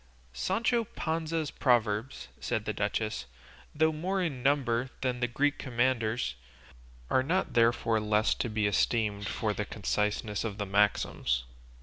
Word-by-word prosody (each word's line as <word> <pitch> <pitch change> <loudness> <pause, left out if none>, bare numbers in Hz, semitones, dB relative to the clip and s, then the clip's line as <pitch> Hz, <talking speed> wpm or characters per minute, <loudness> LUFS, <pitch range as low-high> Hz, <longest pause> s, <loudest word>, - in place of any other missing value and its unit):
"Sancho 230 - +1
Panza's 160 -5 -2
proverbs," 115 -2 +1
said - - -2
the - - -1
duchess, - - -2 0.5
"though 160 +1 +3
more 180 +5 -1
in 155 -9 -2
number 130 -3 +1
than 125 -2 -1
the 120 - +1
Greek 145 +4 0
Commander's, 120 - 0 0.8
are 130 - +4
not 180 +8 0
therefore 115 -1 +3
less 105 +1 +2
to 120 - -2
be 105 -1 0
esteemed 100 0 +1
for 110 0 -1
the 105 - -2
conciseness 105 0 -1
of 105 -3 -4
the 105 - -2
maxims. 100 -11 +1
120 Hz, 135 wpm, -30 LUFS, 105-145 Hz, 0.8 s, are